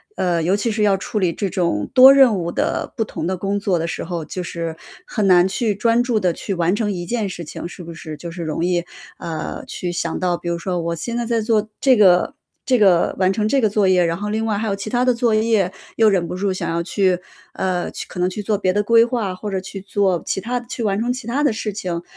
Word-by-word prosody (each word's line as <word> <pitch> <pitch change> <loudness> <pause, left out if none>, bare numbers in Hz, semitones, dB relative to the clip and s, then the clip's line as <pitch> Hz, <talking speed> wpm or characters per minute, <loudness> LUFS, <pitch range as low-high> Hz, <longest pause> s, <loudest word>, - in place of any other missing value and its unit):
呃， 175 -2 0
尤 180 +5 +2
其 220 +2 -1
是 210 0 0
要 200 -2 +4
处 205 +2 -3
理 175 -3 +1
这 200 -3 -2
种 170 - -1
多 260 +2 +9
任 260 -7 +5
务 170 -1 -3
的 - - -2
不 225 - 0
同 165 - -5
的 190 - -1
工 200 +2 -2
作 195 -3 0
的 165 - -2
时 - - -4
候， 170 -2 -4
就 180 - -5
是 165 -1 -5 0.3
很 210 -4 -1
难 180 -1 +6
去 210 +1 -1
专 230 +3 +2
注 245 -2 0
地 185 -3 +1
去 195 +4 -4
完 175 +1 +1
成 210 -1 -1
一 175 -3 -3
件 225 0 -1
事 175 -2 -6
情， 160 - -7
是 180 +1 -10
不 170 0 -8
是？ 155 -1 -8
就 170 +3 -8
是 170 0 -6
容 160 +1 -2
易， 175 -1 0 0.3
啊， 160 -2 -5
去 175 -1 -4
想 170 -1 -2
到 180 -1 0
比 175 - -9
如 170 0 0
说 180 0 -2
我 170 0 -2
现 235 +8 -4
在 240 - -1
在 230 -1 0
做 215 -1 +1
这 265 -2 +5
个 185 +1 +5 0.3
这 255 -2 +3
个 190 -5 +4
完 185 0 +3
成 210 +2 0
这 270 +3 +2
个 215 - +3
作 205 -1 +2
业。 180 -1 +4
然 165 0 0
后 205 +2 -4
另 220 +1 -1
外 215 -2 0
还 225 - -2
有 200 - 0
其 200 +2 -6
他 245 +2 +1
的 250 - +4
作 235 -1 +1
业， 215 -4 +2 0.3
又 220 -1 +5
忍 180 -4 +1
不 - - -5
住 195 +1 -1
想 185 - -3
要 170 +1 -1
去， 185 0 +1 0.4
呃， 180 -2 -1
去 - - -6
可 - - -8
能 180 +1 +2
去 200 +3 -5
做 210 0 0
别 185 -2 0
的 205 - +2
规 230 +2 +5
划， 230 -6 -2
或 210 +3 -6
者 190 -1 -2
去 195 +1 -8
做 195 -3 0
其 195 - -2
他 245 +4 -2
的 240 - -13
去 240 - -5
完 200 -2 0
成 240 +2 0
其 255 -2 -8
他 270 +5 0
的 285 -6 +3
事 215 -1 -3
情。 180 -4 -4
195 Hz, 290 characters per minute, -20 LUFS, 175-220 Hz, 0.4 s, 多